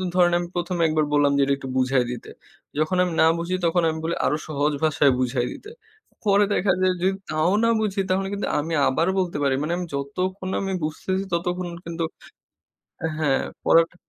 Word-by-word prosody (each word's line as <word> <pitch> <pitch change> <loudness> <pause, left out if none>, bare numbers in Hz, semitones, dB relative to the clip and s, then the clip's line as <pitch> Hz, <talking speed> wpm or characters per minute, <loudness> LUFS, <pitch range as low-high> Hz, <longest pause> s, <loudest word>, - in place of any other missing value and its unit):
ধরেন 175 -1 +4
আমি 175 - -4
১ম 175 +1 -2
এ - - +4
একবার 155 -1 +1
বললাম 145 -1 +4
যে - - +3
এটা 140 - +2
একটু 135 - -7
বুঝায় 130 -1 +2
দিতে, 125 - -7 0.5
যখন 155 +4 +1
আমি 175 -2 -2
না - - +7
বুঝি 170 +2 -3
তখন 170 +1 +2
আমি 160 0 -3
বলি 170 +1 -1
আরো 150 - +2
সহজ 150 0 0
ভাষায় 145 -2 +4
বুঝাই 125 -1 0
দিতে। 425 - -11 0.6
পরে 200 +1 +5
দেখা 190 -1 +2
যায় 185 0 +3
যদি 190 +1 +2 0.2
তাও 155 +3 +2
না 230 - +4
বুঝি 200 -2 0
তাহলে 190 +1 +1
কিন্তু 200 - -2
আমি 160 +3 -3
আবার 165 +6 +1
বলতে 175 -5 -1
পারি 135 -1 +2
মানে 155 +3 -1
আমি 180 - -3
যতক্ষণ 185 +7 -3
আমি 195 -1 -2
বুঝতেছি 185 +5 -2
ততক্ষণ 175 +1 -1 0.2
কিন্তু 170 0 -3 1.0
অ্যা 160 - -2
হ্যাঁ 145 -4 +2 0.2
পড়াটা 165 +1 +4
170 Hz, 195 wpm, -24 LUFS, 145-185 Hz, 1.0 s, না